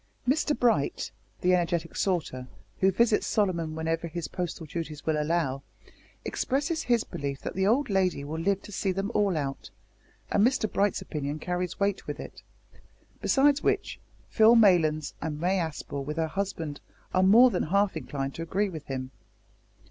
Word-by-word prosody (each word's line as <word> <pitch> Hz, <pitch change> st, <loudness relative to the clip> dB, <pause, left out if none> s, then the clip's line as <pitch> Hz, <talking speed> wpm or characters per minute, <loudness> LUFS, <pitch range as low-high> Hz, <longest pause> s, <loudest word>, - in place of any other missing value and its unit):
Mr 295 Hz, +2 st, +2 dB
Bright, 225 Hz, -, +1 dB, 0.3 s
the 180 Hz, +1 st, +3 dB
energetic 170 Hz, -2 st, 0 dB
sorter, 155 Hz, -9 st, -1 dB, 0.3 s
who 190 Hz, -, +4 dB
visits 220 Hz, +2 st, +2 dB
Solomon 170 Hz, -7 st, 0 dB
whenever 165 Hz, +1 st, -2 dB
his 165 Hz, -2 st, -5 dB
postal 175 Hz, -1 st, -4 dB
duties 155 Hz, -1 st, -6 dB
will 155 Hz, -1 st, +1 dB
allow, 150 Hz, -4 st, 0 dB, 0.6 s
expresses 290 Hz, +5 st, -1 dB
his 240 Hz, -7 st, +2 dB
belief 140 Hz, -1 st, -5 dB
that -, -, -5 dB
the 190 Hz, +1 st, +1 dB
old 260 Hz, +7 st, +3 dB
lady 185 Hz, -7 st, +1 dB
will 155 Hz, +3 st, -4 dB
live 195 Hz, +3 st, 0 dB
to -, -, -11 dB
see 195 Hz, -1 st, -1 dB
them 195 Hz, +3 st, -2 dB
all 200 Hz, -5 st, +2 dB
out, 135 Hz, -2 st, -4 dB, 0.6 s
and 205 Hz, -, +3 dB
Mr 245 Hz, -1 st, +3 dB
Bright's 200 Hz, -1 st, +1 dB
opinion 145 Hz, -1 st, -4 dB
carries 180 Hz, +2 st, -3 dB
weight 200 Hz, -1 st, 0 dB
with -, -, -5 dB
it; -, -, -9 dB, 0.8 s
besides 285 Hz, +1 st, +3 dB
which, -, -, 0 dB, 0.3 s
Phil 220 Hz, +2 st, +6 dB
Maylands 165 Hz, -9 st, +4 dB
and 150 Hz, -1 st, -3 dB
May 185 Hz, +3 st, +1 dB
Aspel 150 Hz, -4 st, -4 dB
with 150 Hz, +3 st, -5 dB
her 160 Hz, -1 st, 0 dB
husband 165 Hz, -5 st, -4 dB, 0.3 s
are 185 Hz, -, +3 dB
more 230 Hz, +7 st, +7 dB
than 180 Hz, -, 0 dB
half 200 Hz, +4 st, +1 dB
inclined 135 Hz, +1 st, -4 dB
to -, -, -7 dB
agree 195 Hz, +5 st, 0 dB
with 160 Hz, -5 st, -8 dB
him. 130 Hz, -1 st, -4 dB
175 Hz, 165 wpm, -28 LUFS, 155-200 Hz, 0.8 s, more